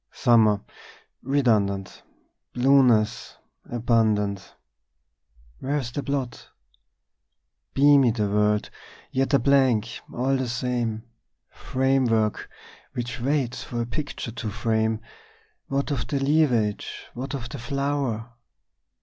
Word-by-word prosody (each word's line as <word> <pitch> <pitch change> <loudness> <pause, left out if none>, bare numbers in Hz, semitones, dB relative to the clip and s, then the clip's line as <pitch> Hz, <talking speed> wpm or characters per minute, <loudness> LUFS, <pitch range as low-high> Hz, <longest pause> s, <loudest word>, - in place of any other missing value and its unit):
Summer 110 -4 +4 0.6
redundant, 110 -8 0 0.5
Blueness 125 -4 +3 0.3
abundant, 110 -4 0 1.0
Where 140 +3 -1
is 125 -4 -3
the 145 - -3
blot? 135 -4 -4 1.3
Beamy 140 -2 +6
the 110 -2 0
world, 105 +1 +1 0.4
yet 135 +2 +1
a - - +7
blank 130 -4 +2
all 135 +2 0
the 130 -2 -2
same, 120 -2 -2 0.5
Framework 130 -5 0 0.4
which 120 0 -4
waits 130 -2 -1
for 120 - -5
a 115 - 0
picture 130 0 -5
to 115 -1 -5
frame: 110 0 0 0.7
What 140 +1 -1
of 140 - -2
the 140 - -1
leafage, 135 -8 +1
what 135 +3 -5
of 120 -3 -6
the 140 - -7
flower? 135 -3 -2
120 Hz, 105 wpm, -25 LUFS, 110-135 Hz, 1.3 s, a